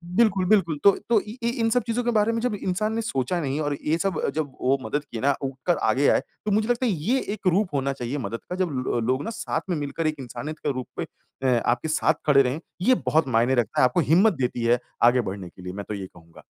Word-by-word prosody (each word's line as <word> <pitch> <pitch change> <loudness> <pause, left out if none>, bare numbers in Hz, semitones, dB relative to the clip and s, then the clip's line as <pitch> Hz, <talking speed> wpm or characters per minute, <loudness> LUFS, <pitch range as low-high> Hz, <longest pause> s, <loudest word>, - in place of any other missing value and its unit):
बिल्कुल, 200 -5 +3
बिल्कुल। 180 -6 +3
तो 200 - +8 0.2
तो 230 - +5
इ 215 +1 -9
इ 235 - +2
इन 225 - +2
सब 245 +1 +2
चीज़ों 235 +2 0
के 240 - +1
बारे 220 0 +3
में 230 - -1
जब 245 -3 0
इंसान 205 +3 -1
ने 230 - -1
सोचा 170 - -1
नहीं 140 0 -2
और 145 -1 -1
ये 155 +2 +2
सब 190 -2 -1
जब 155 -3 -2
वो 135 +2 +3
मदद 145 +2 -2
किए 115 - -7
ना 140 +1 +3
उठकर 135 +6 -1
आगे 140 +2 +3
आए, - - +4 0.3
तो 210 - 0
मुझे 215 +2 +2
लगता 245 +1 +1
है 235 - +2
ये 200 - 0
एक 205 -3 -4
रूप 185 -2 +2
होना 140 0 0
चाहिए 125 +2 -4
मदद 115 -2 -4
का 180 - -3
जब 185 -1 0 0.2
लो 120 - +1
लोग 130 +4 0
ना 225 - -4
साथ 230 - -3
में 180 - +1
मिलकर 150 +2 -2
एक 155 - 0
इंसानियत 145 +4 -6
के 145 - +2
रूप 130 -1 -5
में - - -1 0.4
अ, 125 -3 +3
आपके 120 +6 +1
साथ 155 0 +2
खड़े 140 -2 +6
रहें। 135 +4 -1 0.2
ये 255 +7 +5
बहुत 150 +3 +2
मायने 125 +1 +2
रखता 120 -2 0
है, - - +5
आपको 125 +7 +1
हिम्मत 195 +6 +5
देती 125 -5 -2
है 120 +1 +4 0.2
आगे 120 +1 +5
बढ़ने 95 -4 -6
के 90 - -15
लिए, 90 0 -6
मैं 100 0 -6
तो 105 - -2
ये 95 -2 -5
कहूँगा। 85 -1 -17
150 Hz, 265 wpm, -25 LUFS, 125-200 Hz, 0.4 s, तो